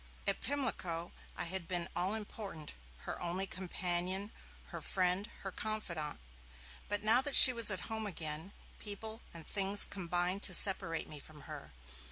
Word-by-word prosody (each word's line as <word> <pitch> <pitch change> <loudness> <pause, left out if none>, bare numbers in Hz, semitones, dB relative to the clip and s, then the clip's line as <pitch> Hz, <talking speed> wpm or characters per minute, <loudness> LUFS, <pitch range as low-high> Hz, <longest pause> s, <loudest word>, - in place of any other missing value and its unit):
At - - -1
Pimlico, 180 -12 -2 0.3
I - - -2
had 175 0 -3
been 175 -2 -3
all 185 +4 0
important, 200 -7 -6 0.3
her - - -7
only 180 +2 -2
companion, 185 +2 -2 0.4
her - - -8
friend, 185 +3 -1
her 195 - -5
confidant. 180 -8 -4 0.7
But 205 0 -2
now 225 +4 +5
that 285 +1 -2
she 255 - +12
was 230 -2 +3
at 190 -3 -1
home 220 -1 -3
again, 160 -1 -4 0.3
people 220 +2 -6
and 165 -2 -10
things 200 0 +5
combined 180 +1 -3
to 185 - +2
separate 165 -4 +2
me 150 - -8
from 150 +1 -13
her. 75 - -10
190 Hz, 155 wpm, -33 LUFS, 170-210 Hz, 0.7 s, she